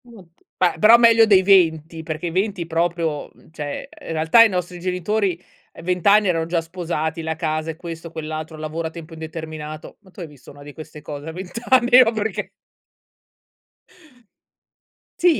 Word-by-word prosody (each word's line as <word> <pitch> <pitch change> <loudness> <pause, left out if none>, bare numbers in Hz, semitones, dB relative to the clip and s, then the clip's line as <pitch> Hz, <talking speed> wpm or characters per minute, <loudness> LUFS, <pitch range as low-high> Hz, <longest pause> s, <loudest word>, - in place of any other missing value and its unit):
Mh, 235 -3 -15 0.4
ma 175 -3 +1
però 220 +5 +8
meglio 230 -1 +6
dei 200 -4 +5
20, 165 -4 +2
perché 160 +2 -4
i - - -4
20 190 0 -1
proprio, 165 -2 -1
mhmm, - - -23
cioè, 150 -2 -6
uhm, - - -12
in - - -3
realtà 160 +9 +5
i 225 - +4
nostri 180 -2 -4
genitori, 185 +1 -1 0.3
ehm, - - -12
20 180 0 -2
anni 205 0 +5
erano 165 -3 0
già 170 0 -1
sposati, 165 -2 -4
la 160 0 -3
casa 155 -1 -2
e - - -11
questo, 165 0 -8
quell'altro, 155 0 -6
lavoro 155 +1 -4
a - - -6
tempo 165 0 -11
indeterminato, 160 -1 -8
ma 190 -2 -21
tu - - -16
hai 170 - -6
visto 145 -4 -16
una 145 0 -14
di 145 0 -11
queste 155 0 -11
cose 145 0 -8
a - - -5
20 185 +6 -7
anni? 250 -1 +6
No 225 - +1
perché 220 -1 -3 2.7
Sì? 345 -3 +3
165 Hz, 185 wpm, -21 LUFS, 160-190 Hz, 2.7 s, però